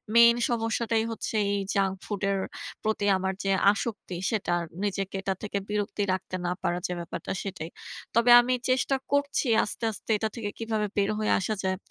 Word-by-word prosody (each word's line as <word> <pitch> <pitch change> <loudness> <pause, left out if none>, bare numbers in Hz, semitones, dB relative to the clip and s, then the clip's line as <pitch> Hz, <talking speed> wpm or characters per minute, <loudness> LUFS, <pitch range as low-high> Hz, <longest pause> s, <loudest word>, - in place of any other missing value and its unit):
Main 235 0 +8
সমস্যাটাই 225 -1 0
হচ্ছে 225 - -4 0.2
এই 200 - +1 0.2
junk 195 -1 +2
ফুডের 200 -1 -1 0.4
প্রতি 215 -1 0
আমার 190 0 -1
যে 195 - +1 0.2
আসক্তি 205 -3 -4 0.2
সেটা 215 -5 -1
আর 170 - -3 0.2
নিজেকে 195 -1 -2
এটা 195 0 0
থেকে 205 -1 -2
বিরক্তি 205 0 -1
রাখতে 185 0 -4
না 175 - 0
পারার 175 -1 -1
যে 180 - -3
ব্যাপারটা 170 +1 -5
সেটাই। 175 -5 -5 0.5
তবে 235 +1 +5
আমি 250 +1 0 0.2
চেষ্টা 255 +1 +2 0.2
করছি 285 -1 +1 0.2
আস্তে, 210 - -4
আস্তে 215 - -7
এটা 220 +1 -1
থেকে 225 -4 -3
কীভাবে 220 -2 -1
বের 200 0 +2
হয়ে 215 - +1
আসা 205 +3 -1
যায়। 190 0 0
205 Hz, 175 wpm, -27 LUFS, 190-225 Hz, 0.5 s, Main